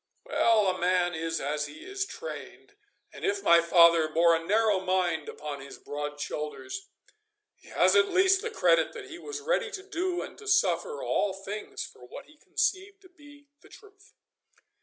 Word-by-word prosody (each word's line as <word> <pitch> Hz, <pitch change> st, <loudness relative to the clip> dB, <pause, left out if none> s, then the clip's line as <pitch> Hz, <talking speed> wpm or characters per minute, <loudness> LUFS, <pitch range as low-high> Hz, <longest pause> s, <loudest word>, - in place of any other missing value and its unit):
Well, 225 Hz, -3 st, +3 dB
a 185 Hz, -1 st, 0 dB
man 180 Hz, 0 st, +2 dB
is 165 Hz, 0 st, -2 dB
as 145 Hz, +1 st, -2 dB
he 145 Hz, +2 st, -12 dB
is 395 Hz, +1 st, -3 dB
trained, 415 Hz, -3 st, -9 dB, 0.4 s
and -, -, -11 dB
if 400 Hz, 0 st, 0 dB
my 170 Hz, 0 st, +6 dB
father 170 Hz, -1 st, +5 dB
bore 165 Hz, +2 st, +4 dB
a 165 Hz, -, -3 dB
narrow 210 Hz, +2 st, +2 dB
mind 180 Hz, -4 st, 0 dB
upon 145 Hz, -2 st, -7 dB
his 140 Hz, -, -10 dB
broad 145 Hz, 0 st, -6 dB
shoulders, 380 Hz, -, -5 dB, 0.7 s
he -, -, -22 dB
has -, -, +3 dB
at 435 Hz, -2 st, +4 dB
least 380 Hz, +1 st, +4 dB
the 455 Hz, -, -3 dB
credit -, -, +2 dB
that 415 Hz, -5 st, -9 dB
he 335 Hz, -, -8 dB
was 430 Hz, +3 st, -6 dB
ready 480 Hz, 0 st, 0 dB
to 405 Hz, -4 st, -7 dB
do 365 Hz, -2 st, -2 dB
and -, -, -11 dB
to 425 Hz, -, -12 dB
suffer 410 Hz, +3 st, +1 dB
all 200 Hz, -2 st, 0 dB
things 200 Hz, +2 st, -6 dB
for -, -, -15 dB
what 125 Hz, -, -10 dB
he 300 Hz, -, -20 dB
conceived 390 Hz, +5 st, -2 dB
to 370 Hz, -, -17 dB
be 290 Hz, -4 st, -18 dB
the 400 Hz, -, -19 dB
truth. 400 Hz, -2 st, -18 dB
230 Hz, 180 wpm, -28 LUFS, -, 0.7 s, my